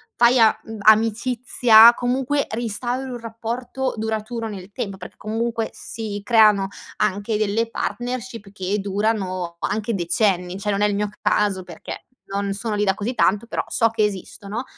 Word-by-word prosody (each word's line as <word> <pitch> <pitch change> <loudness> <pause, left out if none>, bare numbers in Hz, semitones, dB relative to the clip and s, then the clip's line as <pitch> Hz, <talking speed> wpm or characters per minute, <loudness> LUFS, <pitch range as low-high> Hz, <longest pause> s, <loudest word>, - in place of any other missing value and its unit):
fai 240 +1 +5
a 220 -1 +5
mhmm, 225 -1 -8
amicizia, 225 +1 +6
comunque, 260 +4 0
ristauri 240 +3 -3
un 245 - -5
rapporto 235 +3 -4
duraturo 220 +1 -3
nel 200 -2 -8
temp 200 -1 -5
perché 180 - -11
comunque 225 +1 -2
si 215 -3 -5
creano 210 -4 +4 0.3
anche 210 +1 0
delle 215 +2 0
partnership 240 -3 -4
che 195 +1 -2
durano 195 -4 -2
anche 215 +4 -2
decenni, 180 0 0
cioè, 210 +1 -1
non 200 0 -1
è 210 - +4
il 205 - -1
mio 210 +1 -1
caso 200 -3 +1
perché 175 -2 -9 0.2
non 200 0 -2
sono 215 +2 -3
lì 205 - 0
da 195 -2 +2
così 215 +5 -3
tanto, 210 -2 +2
però - - -3
so 230 - +2
che 225 -1 0
esistono, 205 +2 -4
215 Hz, 160 wpm, -22 LUFS, 200-235 Hz, 0.3 s, amicizia